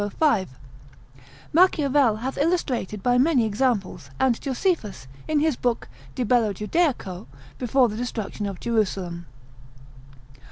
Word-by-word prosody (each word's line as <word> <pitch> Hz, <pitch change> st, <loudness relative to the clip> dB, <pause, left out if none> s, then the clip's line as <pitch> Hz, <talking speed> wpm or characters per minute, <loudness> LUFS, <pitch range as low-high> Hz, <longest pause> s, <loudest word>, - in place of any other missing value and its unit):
Machiavel 290 Hz, -, +4 dB
hath 265 Hz, +2 st, -3 dB
illustrated 275 Hz, -, -1 dB
by 245 Hz, 0 st, +3 dB
many 265 Hz, -4 st, +3 dB
examples, 205 Hz, -, -1 dB
and 255 Hz, -3 st, +2 dB
Josephus, 265 Hz, -, -2 dB, 0.2 s
in 305 Hz, -2 st, +1 dB
his 310 Hz, -3 st, +2 dB
book 240 Hz, -1 st, -2 dB, 0.3 s
de 250 Hz, -, -1 dB
bello 225 Hz, -2 st, +2 dB
Judaico, 210 Hz, -, -1 dB, 0.3 s
before 250 Hz, +1 st, +3 dB
the 215 Hz, -1 st, -5 dB
destruction 220 Hz, -3 st, -4 dB
of 195 Hz, -2 st, -6 dB
Jerusalem. 190 Hz, -7 st, -2 dB
245 Hz, 110 wpm, -24 LUFS, 205-275 Hz, 0.3 s, Machiavel